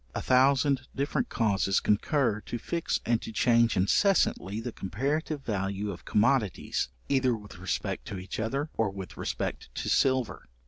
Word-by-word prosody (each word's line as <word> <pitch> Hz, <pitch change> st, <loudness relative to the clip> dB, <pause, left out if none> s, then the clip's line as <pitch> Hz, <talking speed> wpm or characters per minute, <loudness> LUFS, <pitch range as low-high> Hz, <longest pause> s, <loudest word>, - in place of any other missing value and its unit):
A -, -, -1 dB
thousand 135 Hz, +1 st, +3 dB
different 145 Hz, -, -1 dB
causes 100 Hz, -4 st, +1 dB
concur, 110 Hz, 0 st, +1 dB
to 120 Hz, -, -3 dB
fix 170 Hz, +8 st, -2 dB
and 115 Hz, 0 st, +1 dB
to -, -, -6 dB
change 115 Hz, 0 st, +3 dB
incessantly 105 Hz, -, +2 dB
the 120 Hz, +2 st, -4 dB
comparative 140 Hz, -, -2 dB
value 100 Hz, -1 st, -2 dB
of 90 Hz, -, -10 dB
commodities, 105 Hz, -, +1 dB, 0.2 s
either 130 Hz, -3 st, +2 dB
with 105 Hz, -3 st, -12 dB
respect 90 Hz, -1 st, -3 dB
to 100 Hz, -, -5 dB
each 90 Hz, +3 st, -6 dB
other, 135 Hz, +7 st, -2 dB
or 110 Hz, -2 st, +1 dB
with 95 Hz, -2 st, -8 dB
respect -, -, -4 dB
to -, -, -3 dB
silver. 130 Hz, -4 st, +1 dB
115 Hz, 150 wpm, -28 LUFS, 100-135 Hz, 0.2 s, thousand